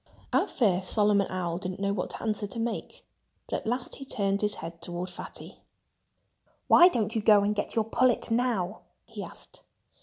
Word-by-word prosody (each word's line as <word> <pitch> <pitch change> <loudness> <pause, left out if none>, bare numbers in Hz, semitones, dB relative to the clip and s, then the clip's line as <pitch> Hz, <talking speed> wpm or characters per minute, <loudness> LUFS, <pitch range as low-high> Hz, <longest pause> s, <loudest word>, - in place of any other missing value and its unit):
At - - +3
first 190 -7 +1
Solomon 205 -2 +3
Owl 175 -2 -2
didn't 185 0 -5
know 200 0 0
what 185 -3 -3
answer 210 -2 -2
to 215 +4 -7
make. 230 0 -4 0.4
But - - -1
at - - -8
last 245 +2 -2
he 275 - -8
turned 200 -5 0
his 210 0 +1
head 165 +1 -8
toward 175 +1 -4
Fatty. - - -9 1.1
"Why 350 - +9
don't 225 - 0
you 220 - 0
go 210 -1 +6
and 205 +1 +1
get 205 - -3
your 225 -2 +2
pullet 245 +1 +2
now?" 225 -5 0 0.2
he - - -8
asked. - - -11
205 Hz, 180 wpm, -28 LUFS, 185-225 Hz, 1.1 s, Why